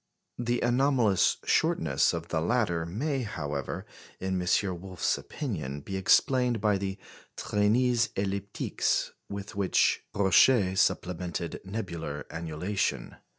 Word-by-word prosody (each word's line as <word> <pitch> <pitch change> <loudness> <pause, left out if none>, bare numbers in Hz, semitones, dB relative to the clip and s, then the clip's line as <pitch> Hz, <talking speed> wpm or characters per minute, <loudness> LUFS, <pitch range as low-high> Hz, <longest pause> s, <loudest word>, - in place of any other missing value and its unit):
The 120 0 0
anomalous 120 -5 +3
shortness - - +2
of - - -5
the 80 - 0
latter 85 -5 0
may, 135 - -2
however, 75 - -4 0.3
in 95 -1 -1
M. 90 0 0
Wolf's 95 -3 -1
opinion, 75 - -5
be 95 +7 -6
explained 125 +5 +3
by 105 -1 +2
the 95 0 -3 0.4
"traînées 115 +3 +2
elliptiques" 100 0 -1 0.2
with 100 0 -6
which 100 -2 +2
Roche 100 +1 +5
supplemented 90 -2 -1
nebular 85 -8 -5
annulation. 85 +5 -2
100 Hz, 110 wpm, -28 LUFS, 85-115 Hz, 0.4 s, Roche